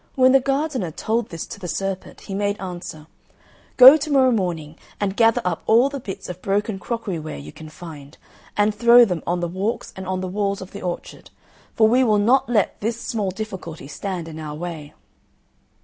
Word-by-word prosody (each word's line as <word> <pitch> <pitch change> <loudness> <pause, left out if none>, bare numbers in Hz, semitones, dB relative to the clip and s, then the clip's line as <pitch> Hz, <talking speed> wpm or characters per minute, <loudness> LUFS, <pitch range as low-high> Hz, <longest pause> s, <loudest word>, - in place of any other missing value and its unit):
When 255 -1 +5
the 270 - +6
gardener 275 - -1
told 225 +8 -2
this 165 -3 -6
to - - -9
the 180 - -6
serpent, 195 +1 -4
he 195 - -8
made 205 +1 -1
answer, 175 -4 -7 0.7
"Go 265 +4 +11
to 305 +1 -4
morrow 260 -2 +5
morning 170 -8 -2 0.2
and 200 -1 -1
gather 225 0 +3
up 175 -3 -1
all 235 +5 +5
the 280 0 -5
bits 200 -6 -7
of 180 0 -8
broken 200 0 -1
crockery 220 -5 -4
ware 155 - -7
you 70 +2 -9
can 155 -1 -11
find, 155 -3 -11 0.4
and 210 +1 +3
throw 235 +3 +7
them 180 -6 -3
on 175 0 0
the 175 - -1
walks 195 +7 -3
and 190 -1 -7
on 185 0 -1
the 185 - -3
walls 200 +1 -1
of 190 0 -9
the 200 - -8
orchard; 180 -1 -6 0.5
for 220 - +5
we 250 +4 +4
will 215 -4 +3
not 240 +7 +3
let 215 -5 +1
this 225 +2 -2
small 210 -5 -2
difficulty 185 -7 -7
stand 180 +2 -5
in 160 -1 -8
our 150 -1 -6
way." 160 -3 -7
195 Hz, 200 wpm, -22 LUFS, 175-230 Hz, 0.7 s, Go